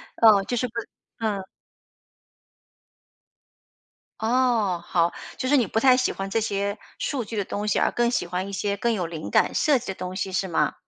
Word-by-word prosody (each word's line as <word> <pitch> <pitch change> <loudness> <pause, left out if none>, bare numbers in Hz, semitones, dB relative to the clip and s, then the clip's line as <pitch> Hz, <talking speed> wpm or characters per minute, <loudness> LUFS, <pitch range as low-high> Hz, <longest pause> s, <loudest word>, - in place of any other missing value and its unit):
嗯， 215 -4 +6
就 245 - -1
是 250 +2 0
不 230 - -17 0.5
嗯。 210 -4 -1 2.8
哦， 225 -6 +1
好， 170 -1 +2 0.3
就 255 - -2
是 290 - +5
你 245 - +3
不 220 +3 0
太 255 0 +6
喜 255 - +1
欢 195 0 -5
这 225 - +1
些 200 -1 -1 0.2
数 255 -5 -2
据 225 - -7
的 200 - +1
东 210 +3 -3
西 210 - +2
而 - - +2
更 240 0 +1
喜 175 - -1
欢 180 +2 -3
一 200 - -7
些 200 +1 -1
更 235 +3 +1
有 180 -5 -1
灵 160 -2 -6
感、 - - +3
设 295 -6 +3
计 245 - -11
的 195 - -3
东 185 0 -6
西 190 0 -3
是 190 +1 0
吗？ 155 -3 +1
205 Hz, 210 characters per minute, -25 LUFS, 190-235 Hz, 2.8 s, 嗯